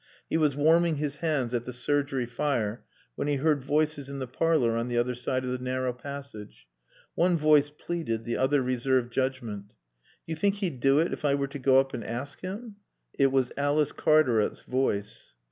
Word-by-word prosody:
He - - +1
was 150 -4 +2
warming 165 +3 +4
his 145 -1 -3
hands 140 -7 -1
at 120 -1 -1
the - - -5
surgery 135 +1 0
fire 120 -3 -2 0.3
when 145 - -3
he 145 - +1
heard 145 0 +1
voices 150 0 0
in 140 - -6
the 130 - -3
parlor 130 -3 +1
on 115 +1 -1
the 120 -1 -2
other 120 +1 +1
side 130 +1 -2
of 125 - -2
the 125 - -2
narrow 130 0 -1
passage. 140 - -9 0.5
One 175 0 +2
voice 150 -2 +4
pleaded, 150 -7 -4
the 120 - -2
other 135 +1 +2
reserved 125 -1 0
judgment. 125 -7 -2
"Do - - -33 0.5
you 160 - -4
think 200 +5 +1
he'd 185 - -3
do 135 +2 +4
it 165 +3 +2
if - - -6
I 140 -1 +3
were 140 -1 -2
to 145 - -7
go 130 0 +5
up 135 0 -1
and 115 - -4
ask 130 +6 -5
him?" 200 +3 -7 0.4
It 135 -1 +4
was 130 -2 +1
Alice 145 +1 +1
Cartaret's 130 -9 +2
voice. 115 -6 -2
135 Hz, 195 wpm, -28 LUFS, 125-150 Hz, 0.5 s, go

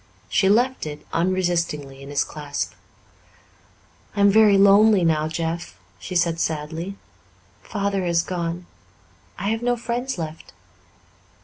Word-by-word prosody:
She 190 - +3
left 245 -2 +2
it 150 0 -8
unresistingly 170 -6 -1
in 140 - -10
his 145 - +1
clasp. 145 -2 -5 1.4
"I 205 - 0
am 200 0 +6
very 210 -1 +6
lonely 200 0 +6
now, 155 -2 +2
Jeff," 165 +1 -4 0.2
she 185 - -7
said 170 -1 +1
sadly. 160 +4 -3 0.7
"Father 200 -2 -2
has 170 -1 +2
gone. 175 0 -4 0.7
I 200 - -2
have 225 +1 -1
no 245 0 +1
friends 245 +2 -3
left." 160 -1 -7
175 Hz, 125 wpm, -23 LUFS, 160-200 Hz, 1.4 s, am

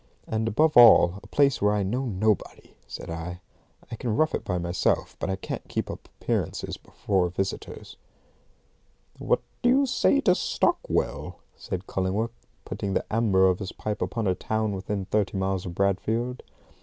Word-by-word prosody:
"And, 110 0 -1
above 150 +8 +2
all, 110 -6 +8
a - - -14
place 140 -2 +2
where 105 +1 +3
I 105 - +1
know 125 +8 -1
nobody," 105 -1 -1
said - - -7
I. 85 +2 -5 0.5
"I - - -3
can 115 -1 -2
rough 155 0 +2
it - - -2
by 90 - -2
myself, 85 0 0
but - - -2
I 95 - 0
can't 95 - -6
keep - - -3
up - - -10
appearances - - -2
before 95 -3 -1
visitors." 95 +2 -5 1.2
"What - - +1 0.2
do 245 - +3
you 275 +2 +4
say 270 +2 +3
to 180 - +4
Stockwell?" - - -1 0.2
said 95 +1 -5
Cullingworth, 100 +6 -1 0.3
putting 100 -1 -3
the - - 0
amber 105 -4 +4
of 90 -1 +1
his 95 -3 -5
pipe 105 0 -4
upon 115 -3 -2
a 95 - +3
town 110 +3 -1
within 95 +1 -3
thirty 105 0 0
miles 95 -1 -1
of 85 - -6
Bradfield. 110 +6 0
105 Hz, 170 wpm, -26 LUFS, 95-115 Hz, 1.2 s, all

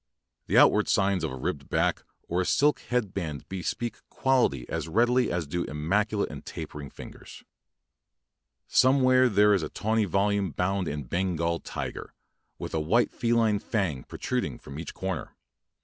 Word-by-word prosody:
The - - +2
out - - +8
ward - - +1
signs 95 -3 +2
of 80 - -1
a - - -5
ribbed 70 0 -4
back - - +1 0.3
or 90 +2 0
a - - -1
silk 145 +8 +3
head 120 -6 -2
band 80 -7 -4
bespeak 105 +5 -3
quality 120 - +1
as 80 -1 -3
readily 120 +6 +2
as 85 -2 -1
do 85 +4 -2
immaculate 100 +8 0
and - - -8
tapering 70 -2 -7 1.8
Somewhere 130 -1 +4
there 105 0 +5
is 100 - +2
a 75 - -4
tawny 110 +2 0
volume 100 +1 +1
bound 90 +4 -1
in 75 -1 -3
Bengal 85 +3 -1
tiger, - - -6 0.4
with - - -6
a 80 - +1
white 105 +11 +2
feline 115 -3 +2
fang 95 - -2
protruding - - -3
from 70 - -9
each 80 - -7
comer. 95 -3 -4
95 Hz, 155 wpm, -27 LUFS, 80-110 Hz, 1.8 s, out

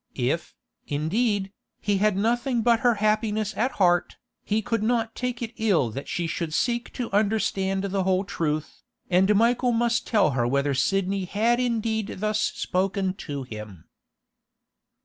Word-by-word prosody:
If, 135 +6 -2 0.3
indeed, 195 +7 0 0.3
he 205 -2 0
had 210 -1 +2
nothing 235 +3 +1
but 235 -1 +4
her 245 -2 +3
happiness 215 0 0
at 250 +4 0
heart, 175 -2 +2 0.3
he 215 +1 0
could 230 0 -1
not 225 0 0
take 250 -1 -3
it 230 0 -5
ill 185 - +2
that 135 +6 -6
she 175 - -2
should 160 0 -3
seek 240 +3 0
to 245 -2 -4
understand 200 -2 +1
the 195 0 -1
whole 185 0 +1
truth, 155 -6 -3 0.3
and 190 +4 +4
Michael 240 +3 +3
must 235 0 +1
tell 205 -9 +3
her 120 -2 0
whether 140 +2 +1
Sidney 195 +7 0
had 225 +6 +1
indeed 225 -3 -1
thus 215 +2 0
spoken 190 -2 0 0.2
to 140 -2 -3
him. 105 -8 -9
205 Hz, 150 wpm, -25 LUFS, 175-225 Hz, 0.3 s, but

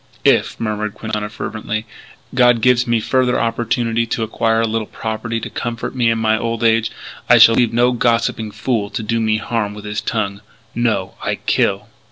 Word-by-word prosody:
"If," - - +3
murmured 105 -2 -3
Quintana 105 -1 -4
fervently, 110 0 -4 0.5
"God 125 -2 +4
gives 125 0 +3
me 115 -1 +2
further 125 +2 +1
opportunity 115 0 0
to 115 0 -2
acquire 115 +1 +1
a 115 - +1
little 110 -1 -2
property 115 +1 -4
to - - -6
comfort 115 -1 -4
me 120 -3 +2
in 115 - +1
my 110 0 +1
old 115 0 -2
age, 115 0 +3 0.4
I - - +8
shall 115 - +8
leave 120 -1 +2
no 120 +2 +3
gossiping 115 -2 0
fool 110 -1 -2
to 110 - -4
do 115 +2 -1
me 110 -1 +1
harm 110 -2 -2
with 105 0 -10
his 105 0 -3
tongue. 100 -3 -2 0.3
No! 110 -5 -1
I - - 0
kill. - - 0
115 Hz, 185 wpm, -18 LUFS, 110-115 Hz, 0.5 s, I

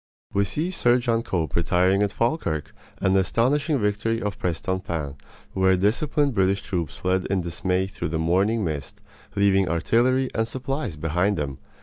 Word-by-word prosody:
We 100 0 +2
see 155 - -2
Sir 125 -8 +3
John 120 -2 +1
Cope 85 -8 -2
retiring 90 +3 +2
at 100 -1 +1
Falkirk, 110 - -1 0.3
and 95 0 +2
the - - +5
astonishing 140 - +1
victory 110 +1 0
of 105 -4 -4
Prestonpans, 85 -4 -2 0.4
where 95 -1 +3
disciplined 140 +8 +1
British 95 -1 +1
troops 90 -7 -3
fled 95 0 0
in 95 -1 0
dismay 90 +2 -1
through 85 -4 -5
the 80 - -1
morning 95 +7 +2
mist, 75 -5 -4 0.4
leaving 95 -2 +3
artillery 120 +10 +2
and 110 0 0
supplies 130 - -3
behind 90 +6 0
them. 70 -3 -3
95 Hz, 155 wpm, -24 LUFS, 90-115 Hz, 0.4 s, the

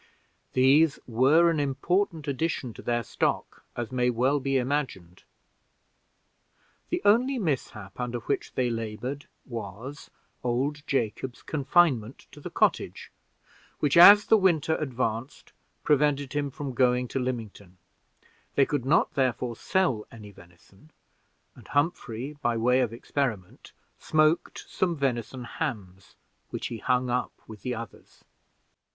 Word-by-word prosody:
These 140 +4 +4
were 140 +9 +4
an 160 - -1
important 155 +4 -1
addition 140 -3 -2
to - - -11
their 120 -1 -1
stock, - - -2
as 120 0 -4
may 125 -1 +1
well 130 +4 +1
be 135 0 0
imagined. 125 - -3 1.7
The - - -2
only 250 +6 +4
mishap 130 - -3
under 125 -1 -2
which - - -3
they 125 -2 +1
labored 115 +5 -5 0.2
was, 115 +4 -8 0.3
old 135 +5 -1
Jacob's 120 0 -2
confinement 140 -6 +1
to 150 - -13
the - - -6
cottage, - - 0 0.7
which, 145 -2 +1
as 200 +4 +10
the 220 - +5
winter 165 -4 +2
advanced, 125 -2 -4 0.3
prevented 145 -2 +2
him 145 -1 -1
from 135 0 -6
going 125 0 +2
to 135 - -2
Lymington; 110 -7 -5 0.8
they 140 - +5
could 145 -3 -2
not, 150 +5 +2
therefore, 125 -3 0
sell 130 - 0
any 105 -3 -11
venison; 90 - -20 0.6
and - - -16
Humphrey, 145 -3 -2
by 120 -4 0
way 125 +3 +3
of 125 -4 +1
experiment, 115 -5 -4 0.3
smoked 155 +1 +1
some 175 -3 -1
venison 130 -3 -2
hams, 95 -5 -6 0.3
which - - -4
he 115 - -6
hung 125 0 0
up 125 0 -1
with 105 -3 -11
the 125 +2 -3
others. 115 +1 -11
130 Hz, 130 wpm, -27 LUFS, 115-145 Hz, 1.7 s, as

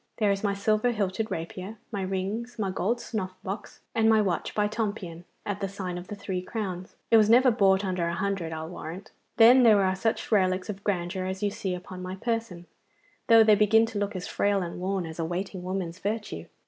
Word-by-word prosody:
There 210 -3 +3
is 195 +1 -2
my 200 -1 +1
silver 215 +3 +2
hilted 210 -1 -1
rapier, 185 +6 -5
my 200 -3 -3
rings, 195 +6 -3
my 200 -4 -1
gold 215 +6 0
snuff 190 -6 -4
box, 195 +3 -6
and 225 -1 +3
my 220 -1 +5
watch 190 -5 -1
by 210 -1 +2
Tompion 205 -6 -4 0.2
at 205 -1 -3
the 195 - -2
sign 185 -2 -5
of 175 +1 -7
the 210 - -6
Three 190 -2 -4
Crowns. 185 -3 -5 0.2
It 225 - +8
was 215 -1 +5
never 250 +2 +6
bought 195 -3 +3
under 180 -2 -1
a 170 - -2
hundred, 195 -4 -2
I'll 160 0 -5
warrant. 175 +3 -8 0.3
Then 240 +3 +8
there 215 -4 +6
are 190 0 +1
such 220 +5 -1
relics 185 -2 +2
of 195 0 -11
grandeur 185 -1 -1
as 190 +1 -4
you 205 - +1
see 200 -3 -3
upon 180 +1 -8
my 185 +1 -5
person, 225 -5 -3 0.6
though 225 -2 +8
they 215 -1 +6
begin 215 +2 +5
to 225 -2 -4
look 205 0 -2
as 180 0 -4
frail 200 -2 +1
and 170 0 -6
worn 190 0 -1
as 160 +1 -8
a - - 0
waiting 180 +3 -4
woman's 185 -1 -4
virtue. 205 - -3
195 Hz, 215 wpm, -27 LUFS, 185-215 Hz, 0.6 s, It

